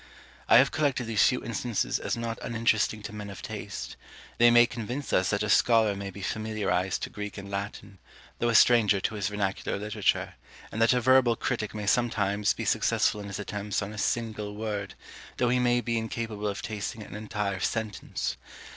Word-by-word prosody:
I - - +8
have 135 +3 +5
collected 140 -5 0
these 115 -2 +1
few 125 - +2
instances 115 -1 -1
as - - -2
not 115 -1 -4
uninteresting 110 -2 0
to 105 - -7
men 105 -1 -6
of 100 - -9
taste; 105 -3 -6 0.4
they 120 0 +8
may 120 0 +7
convince 120 +4 -5
us 95 - +3
that 100 0 0
a - - -1
scholar 110 -1 +4
may 100 0 -5
be 100 +1 -9
familiarized 105 -4 -1
to - - -4
Greek 105 0 -6
and 100 0 -8
Latin, 100 0 -6 0.4
though 120 - +1
a 115 - +1
stranger 110 -4 +6
to 105 - -2
his 105 -2 -2
vernacular 100 -2 -2
literature; 105 +1 0 0.4
and 110 - -3
that 115 +2 +5
a 125 - +1
verbal 130 -1 +5
critic 110 -1 -3
may 105 -1 -4
sometimes 105 -2 +1
be - - -4
successful 105 - +2
in 100 - -7
his 100 - -5
attempts 105 0 -3
on 100 +1 -6
a 110 - -6
single 110 -2 -2
word, 105 -3 -4 0.4
though 125 - +2
he 125 +1 +2
may 120 0 +3
be 115 -1 -1
incapable 110 -2 -4
of 100 -1 -4
tasting 110 +1 -4
an 100 - -10
entire 105 -2 -3
sentence. 110 +2 -3
105 Hz, 190 wpm, -28 LUFS, 100-115 Hz, 0.4 s, I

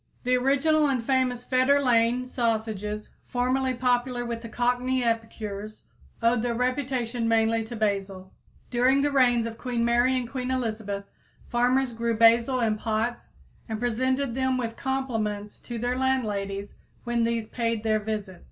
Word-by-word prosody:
The 250 0 +2
original 285 +4 +3
and 255 -4 -1
famous 255 -2 +1
Fetter 260 +3 +3
Lane 245 -1 +2
sausages, 220 -4 -2 0.2
formerly 255 +1 0
popular 245 0 0
with 230 -1 -5
Cockney 250 +1 +1
epicures, 215 -2 -3 0.4
owed 230 0 +3
their 235 0 -1
reputation 250 -2 -1
mainly 225 0 +2
to 235 +2 -7
basil. 195 -3 -2 0.4
During 255 +3 +3
the 290 - +1
reigns 245 -4 +3
of 230 0 -6
Queen 240 -2 -1
Mary 240 +2 +3
and 250 -2 -2
Queen 255 0 -4
Elizabeth 215 -5 -2 0.4
farmers 250 +1 +2
grew 230 0 -1
basil 230 +3 +5
in 220 -2 +1
pots 225 +2 -2 0.4
and 220 -1 -3
presented 260 +2 0
them 260 0 +1
with 230 -2 -3
compliments 225 -6 -3
to 240 - -7
their 245 +2 -1
landladies 205 -7 -1 0.3
when 240 -1 0
these 230 -1 0
paid 230 -2 -2
their 215 -1 +2
visits. 210 -4 -4
240 Hz, 145 wpm, -26 LUFS, 225-255 Hz, 0.4 s, basil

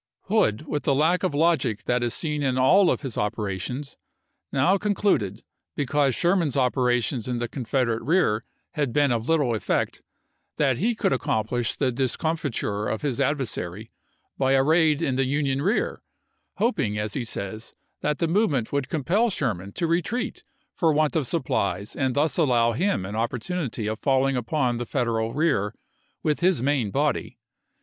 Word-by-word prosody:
Hood, 190 - +1
with 150 -1 -2
the 140 - +1
lack 160 +6 +3
of 185 -6 -1
logic 145 -9 +1
that 125 0 0
is 120 -1 0
seen 150 -3 -2
in 130 -2 0
all 180 +9 +5
of - - 0
his 135 -6 -4
operations, 105 +5 -3 0.5
now 160 +9 +3
concluded, 200 - 0 0.3
because 140 -2 +1
Sherman's 170 -6 +1
operations 125 -2 +1
in 125 -1 -1
the 120 0 -2
Confederate 120 -2 -1
rear 140 - +2 0.3
had 145 -8 -2
been 145 -2 +3
of 115 +2 -1
little 145 -7 +2
effect, 110 - -1 0.6
that 135 -4 +2
he 230 +4 +1
could 215 - +1
accomplish 120 -1 -1
the 130 -3 +1
discomfiture 130 -5 -1
of 110 - -3
his 140 -3 -1
adversary 115 - -2 0.5
by 135 0 +3
a 135 0 +4
raid 160 0 +3
in 130 -4 0
the 135 - +2
Union 140 0 0
rear; 195 +9 0 0.5
hoping, 155 - 0
as 105 0 -2
he 130 - -2
says, 110 0 -5 0.3
that 150 -1 0
the 170 - 0
movement 160 - +1
would 140 -2 -1
compel 180 - +1
Sher 135 - 0
man 95 +2 -9
to 170 - -1
retreat 180 +10 -1 0.3
for 165 -2 +2
want 155 +1 +1
of 150 -6 +1
supplies 105 - -1
and 130 -2 0
thus 150 +2 +1
allow 125 -8 +3
ATLANTA 125 - -1
281 - - +3
him 95 - -1
an 110 - +1
opportunity 125 0 -3
of 110 +1 -3
falling 135 -1 +2
upon 125 0 0
the 120 0 -4
Federal 115 -4 0
chap. - - -9
xii. 155 +3 +2
rear 105 -10 0 0.5
with 150 -1 +1
his 180 -7 +2
main 135 -6 +1
body. - - -1
135 Hz, 175 wpm, -25 LUFS, 115-160 Hz, 0.6 s, all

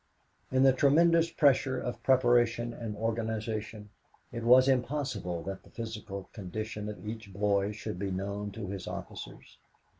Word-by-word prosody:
In 130 0 +4
the 135 -1 +6
tremendous 165 +5 +4
pressure 135 -4 +3
of 120 -2 -5
preparation 120 -2 +3
and 115 -3 -5
organization, 110 -1 -3 0.4
it 120 - -5
was 130 +2 +7
impossible 125 - -1
that 95 -1 -5
the - - -19
physical 105 -4 -6
condition 105 +1 -5
of 105 -1 -8
each 110 -2 -6
boy 100 +1 +1
should 105 -3 -6
be 100 0 -2
known 100 +2 -3
to 110 -1 -5
his 95 -2 -5
officers. - - -8
110 Hz, 145 wpm, -30 LUFS, 100-125 Hz, 0.4 s, was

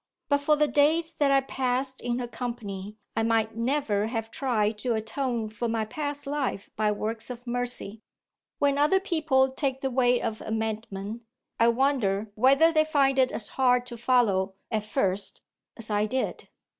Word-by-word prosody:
But 285 -1 +3
for 300 +2 +3
the 300 0 +3
days 320 +3 +2
that 290 -2 +2
I 275 0 +5
passed 260 0 -2
in 240 0 -1
her 245 -1 -3
company, 210 -5 -6 0.2
I 225 - +1
might 225 -1 +1
never 230 -4 0
have 225 -1 -4
tried 220 -5 0
to 240 0 0
atone 225 +1 -2
for 220 +2 -3
my 225 -1 0
past 290 +5 -4
life 275 -8 -3
by 215 -1 +1
works 220 +3 -3
of 245 0 -8
mercy. 245 -3 -3 0.6
When 285 0 +2
other 305 +7 +4
people 315 -8 +2
take 265 -1 -2
the 270 - -1
way 245 -1 +3
of 220 - -3
amendment, 220 -1 -4 0.4
I 230 - +5
wonder 230 -5 +1
whether 275 +9 +5
they 310 -1 +4
find 275 -3 +2
it 255 -1 +4
as 215 - -3
hard 250 -2 +2
to 245 -1 -8
follow, 220 -6 +2 0.2
at 215 -2 -1
first, 200 -4 -1 0.3
as 225 -2 -4
I 210 +1 +2
did?" 260 +4 -3
245 Hz, 170 wpm, -27 LUFS, 220-275 Hz, 0.6 s, I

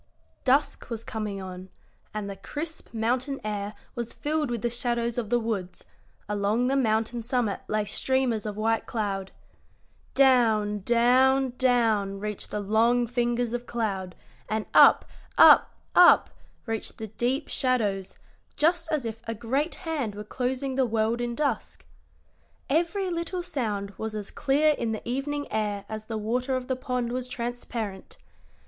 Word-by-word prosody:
Dusk 270 +1 +2
was 230 -1 -4
coming 210 -3 -4
on, 185 0 -8 0.4
and 210 -1 -4
the 200 - -5
crisp 320 +9 -6
mountain 245 +5 -1
air 210 0 -3 0.2
was 235 -1 -5
filled 300 -2 -1
with 235 -2 -3
the 240 - +2
shadows 235 0 -1
of 220 -4 -4
the 240 - +3
woods; 210 -6 -4 0.4
along 210 +3 +1
the 265 +2 +1
mountain 225 -2 +1
summit 235 -3 0
lay 215 -1 0
streamers 235 0 0
of 210 -1 -5
white 225 +1 0
cloud. 195 -4 -2 0.8
Down, 225 -6 +4
down, 250 +4 +3
down 225 -6 +2
reached 210 0 -4
the 210 - -3
long 230 +4 +3
fingers 240 0 0
of 245 0 -4
cloud, 195 -6 -2 0.3
and 215 0 -1
up, - - +7 0.3
up, - - +7 0.2
up 355 -1 +7 0.3
reached 225 -2 -4
the 220 - -5
deep 250 +7 -1
shadows, 210 -7 0 0.4
just 330 +1 +2
as 300 -6 0
if 225 0 -5
a 225 - -2
great 265 +8 -1
hand 280 -11 -2
were 210 - -6
closing 260 +4 -2
the 265 0 +2
world 225 +1 0
in 240 0 -2
dusk. 295 +1 -2 0.9
Every 350 +5 +1
little 340 +1 -3
sound 220 - -3
was 220 0 -4
as 205 -2 -5
clear 295 +3 +3
in 230 -5 -2
the 220 - -6
evening 285 +4 -2
air 210 -2 -1
as 215 0 -6
the 220 0 -4
water 250 +5 -1
of 255 -1 -3
the 260 - +1
pond 250 -2 -2
was 250 0 -3
transparent. 235 -5 -5
235 Hz, 155 wpm, -27 LUFS, 215-260 Hz, 0.9 s, up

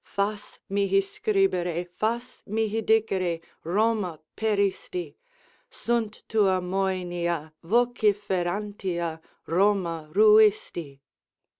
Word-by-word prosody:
Fas 205 +1 -3
mihi 195 0 +2
scribere, 190 -3 0
fas 235 +7 -3
mihi 220 +1 0
dicere 195 -6 +1 0.2
'Roma, 195 -2 0 0.2
peristi.' 215 - -1 0.5
Sunt 230 -3 -2
tua 200 -4 +3
moenia 175 -4 -2
vociferantia 195 -5 0 0.2
'Roma 170 -3 +1
ruisti.'" 210 -8 +4
195 Hz, 70 wpm, -26 LUFS, 175-215 Hz, 0.5 s, ruisti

